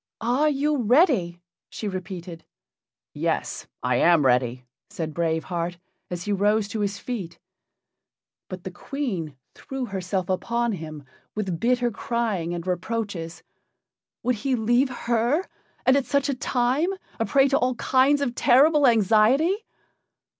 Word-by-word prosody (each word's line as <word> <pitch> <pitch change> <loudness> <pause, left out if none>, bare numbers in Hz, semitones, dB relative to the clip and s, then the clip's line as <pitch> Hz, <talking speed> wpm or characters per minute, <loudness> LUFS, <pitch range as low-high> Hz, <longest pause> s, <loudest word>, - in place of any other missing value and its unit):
"Are 250 +7 +2
you 295 +1 +1
ready?" 230 - +3 0.3
she 215 - -5
repeated. 180 -3 -6 0.7
"Yes, - - -2 0.2
I 125 -1 +2
am 170 -2 +4
ready!" 125 0 +1 0.2
said 160 -2 -5
Brave 160 -1 0
Heart, 175 0 -3 0.3
as 175 -1 -4
he 205 - -3
rose 205 +1 +2
to 220 - -4
his 200 -1 -1
feet. 200 -8 -5 1.1
But 185 -1 -7
the 190 - -6
Queen 185 - -4 0.2
threw 270 -1 -5
herself 185 -3 -3
upon 235 +5 0
him, 155 -6 -7 0.3
with 190 -6 -2
bitter 245 0 +1
crying 220 -6 -2
and 175 -1 -4
reproaches. 180 -2 -3 0.8
Would 250 0 +1
he 260 +5 0
leave 240 +4 +2
her, 245 +7 0 0.4
and 260 - +5
at 280 -2 +1
such 280 0 +1
a - - +1
time, 255 +5 0 0.3
a 225 - +1
prey 275 -1 +4
to 275 - +2
all 250 0 +1
kinds 270 +4 +3
of 260 -4 -1
terrible 285 +4 +5
anxiety? 230 - +4
220 Hz, 140 wpm, -25 LUFS, 175-255 Hz, 1.1 s, and